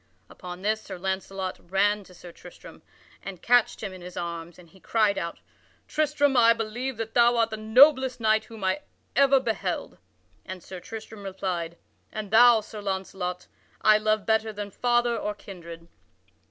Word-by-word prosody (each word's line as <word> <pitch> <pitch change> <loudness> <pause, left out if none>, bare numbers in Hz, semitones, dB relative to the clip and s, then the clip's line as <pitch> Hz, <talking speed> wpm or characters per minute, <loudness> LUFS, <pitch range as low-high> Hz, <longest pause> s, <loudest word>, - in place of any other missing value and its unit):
Upon 180 0 -9
this 215 +1 0
Sir - - -8
Launcelot 190 0 -4
ran 200 +3 +1
to 180 - -16
Sir 175 0 -12
Tristram - - -14 0.4
and 195 -3 -8
catched 245 -2 +3
him 195 -3 -4
in 185 - -11
his 180 0 -10
arms, 170 -1 -5
and 180 -2 -15
he 190 +4 -20
cried 215 0 +1
out: 170 0 -5 0.5
"Tristram, 295 -2 +1
I 230 -1 +6
believe 230 +3 -4
that 225 0 -5
thou 240 0 +4
art 230 -1 +2
the 220 - -4
noblest 260 +4 +5
knight 220 -1 +2
whom 225 -3 -11 0.5
ever 275 0 +5
I - - +6
beheld!" 225 -2 -3 0.4
And 185 -1 -8
Sir 185 - -8
Tristram 220 +2 -9
replied: 185 -3 -4 0.3
"And 210 -2 -6
thou, 230 0 +7
Launcelot, 190 -3 -4 0.4
I 215 0 +6
love 215 -1 0
better 220 0 +1
than 205 -1 -6
father 240 +2 +1
or 210 -2 -3
kindred." 170 -4 -11
215 Hz, 165 wpm, -26 LUFS, 185-230 Hz, 0.5 s, thou